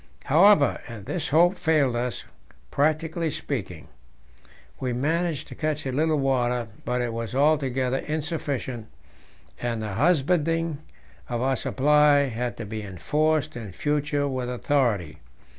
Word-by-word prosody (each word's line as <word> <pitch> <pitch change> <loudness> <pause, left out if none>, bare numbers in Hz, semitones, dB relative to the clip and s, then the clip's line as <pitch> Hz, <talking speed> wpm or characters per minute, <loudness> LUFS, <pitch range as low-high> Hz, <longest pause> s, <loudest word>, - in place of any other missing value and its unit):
However, 160 0 +5
this 120 - -4
hope 170 +5 +5
failed 155 -8 +1
us, 120 +1 -2 0.5
practically 160 +3 0
speaking. 135 - -5 0.9
We 130 -2 -2
managed 160 +4 -1
to - - -8
catch 155 -1 -2
a 130 - -1
little 155 +3 +1
water, 125 -4 0 0.2
but 125 0 0
it 120 -2 -2
was 115 +1 -4
altogether 135 -3 +2
insufficient, 145 -6 -3 0.7
and 120 -2 -2
the 105 -2 -4
husbanding 165 - +1 0.5
of 120 0 -1
our 135 0 +2
supply 145 +1 +3
had 120 +1 -3
to 115 - -5
be 110 +1 -5
enforced 150 - 0
in 110 -5 -7
future 145 +2 0
with 130 -2 -3
authority. 115 - 0
140 Hz, 125 wpm, -25 LUFS, 120-155 Hz, 0.9 s, However